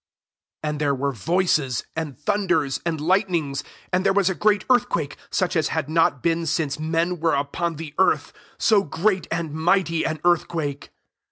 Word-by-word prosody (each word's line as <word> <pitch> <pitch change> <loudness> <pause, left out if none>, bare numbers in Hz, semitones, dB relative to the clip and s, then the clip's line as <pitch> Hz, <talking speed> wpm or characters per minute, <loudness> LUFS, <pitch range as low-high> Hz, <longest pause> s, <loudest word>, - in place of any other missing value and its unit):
18 - - -1
And 150 0 -5
there 140 -2 +2
were 140 +2 -1
voices, 150 - 0
and 160 -4 -4
thunders, 150 -4 0
and 160 -2 -1
lightnings; 165 -4 0 0.3
and 185 +1 +2
[there 195 -1 +3
was] 195 -1 +3
a - - -1
great 210 +1 +2
earthquake, 170 - +1
such 185 -2 0
as 160 -2 +2
had 155 -2 -2
not 165 -5 +2
been 165 0 +1
since 150 -2 -1
men 165 +3 0
•were 160 -3 +1
upon 165 +4 -2
tlie 155 -1 -7
earth, 190 - +2 0.2
so 215 -3 +4
great 185 +1 0
and 165 -2 -3
mighty 165 +1 +1
an 155 -1 -2
earthquake. 160 -4 0
165 Hz, 170 wpm, -23 LUFS, 150-180 Hz, 0.3 s, so